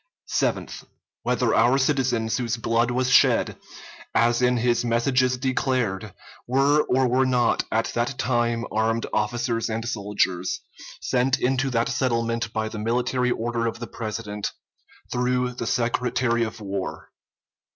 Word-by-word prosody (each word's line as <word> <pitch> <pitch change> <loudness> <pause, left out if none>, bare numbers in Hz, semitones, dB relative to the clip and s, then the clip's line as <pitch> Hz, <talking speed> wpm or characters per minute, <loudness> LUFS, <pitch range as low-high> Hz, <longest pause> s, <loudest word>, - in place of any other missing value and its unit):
Seventh. - - -1 0.4
Whether 125 -1 +1
our 120 +4 +4
citizens 130 -5 +1
whose 120 -2 -1
blood 115 +1 +1
was 125 +1 0
shed, - - +4 0.6
as 120 +2 +3
in 125 0 +3
his 120 0 +1
messages 125 +2 +2
declared, 125 -6 -1 0.3
were 140 +4 +3
or 130 0 +2
were 130 +2 +3
not 125 -2 +2
at 110 +1 +1
that 120 +3 -1
time 120 -2 0
armed 115 +1 0
officers 115 +2 0
and 115 +1 -3
soldiers, 100 -4 -1 0.4
sent 130 +1 +1
into 135 +2 +1
that 115 -2 +1
settlement 115 -3 0
by 110 -1 -2
the 110 0 -6
military 125 +3 0
order 115 -1 -1
of 115 - -3
the 120 - -6
President, 110 -2 -5 0.6
through 125 0 0
the 120 -2 -5
Secretary 120 0 0
of 115 +1 -5
War. 100 -2 -5
120 Hz, 135 wpm, -24 LUFS, 115-125 Hz, 0.6 s, our